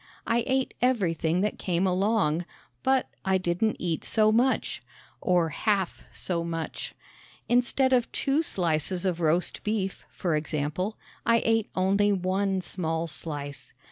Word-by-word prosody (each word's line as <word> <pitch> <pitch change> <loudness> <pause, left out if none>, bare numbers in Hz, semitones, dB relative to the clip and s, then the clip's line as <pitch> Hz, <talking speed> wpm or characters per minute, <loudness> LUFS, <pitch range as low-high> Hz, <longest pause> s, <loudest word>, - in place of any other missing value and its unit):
I 230 +1 +2
ate 265 0 +1
everything 180 -9 +2
that 210 - -1
came 180 0 0
along, 185 -3 +2 0.4
but 265 -1 +2 0.2
I 190 -1 +3
didn't 185 +4 0
eat 170 -3 -2
so 215 -1 +3
much 245 +4 +1 0.4
or 175 -3 +2
half 195 +3 0
so 170 -2 -2
much. 165 -1 -4 0.5
Instead 250 +2 +3
of 245 -2 +2
two 280 +3 +1
slices 175 - 0
of 180 -2 0
roast 170 +2 +1
beef, 210 -3 -2
for 170 -4 -1
example, 155 +6 -2 0.3
I 230 0 +3
ate 225 -2 +2
only 200 +2 +3
one 190 0 0
small 165 -3 -2
slice. 145 -3 -5
185 Hz, 135 wpm, -27 LUFS, 170-220 Hz, 0.5 s, I